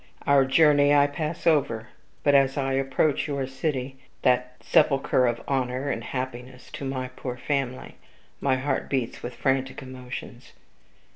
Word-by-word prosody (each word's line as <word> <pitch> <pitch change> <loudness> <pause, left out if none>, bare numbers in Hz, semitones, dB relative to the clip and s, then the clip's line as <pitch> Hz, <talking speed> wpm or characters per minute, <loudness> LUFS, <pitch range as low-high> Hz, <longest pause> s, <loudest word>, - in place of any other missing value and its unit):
"Our 140 -1 +5
journey 145 0 +5
I 145 0 +6
pass 155 +2 -4
over; 120 -9 +2 0.3
but 145 - +4
as 135 -1 +4
I 135 -1 0
approach 135 +2 +1
your 140 -2 -2
city, 135 -1 -3 0.2
that 125 0 +2
sepulcher 135 -2 +3
of 120 0 -1
honor 130 +1 -1
and 115 - -3
happiness 125 0 -6
to - - -6
my 130 -1 -3
poor 125 -1 -6
family, 130 -1 -3 0.4
my 135 -2 +2
heart 135 +3 -2
beats 130 -4 -2
with 120 0 -6
frantic 135 +1 -1
emotions. 130 -1 -9
135 Hz, 145 wpm, -26 LUFS, 125-140 Hz, 0.4 s, I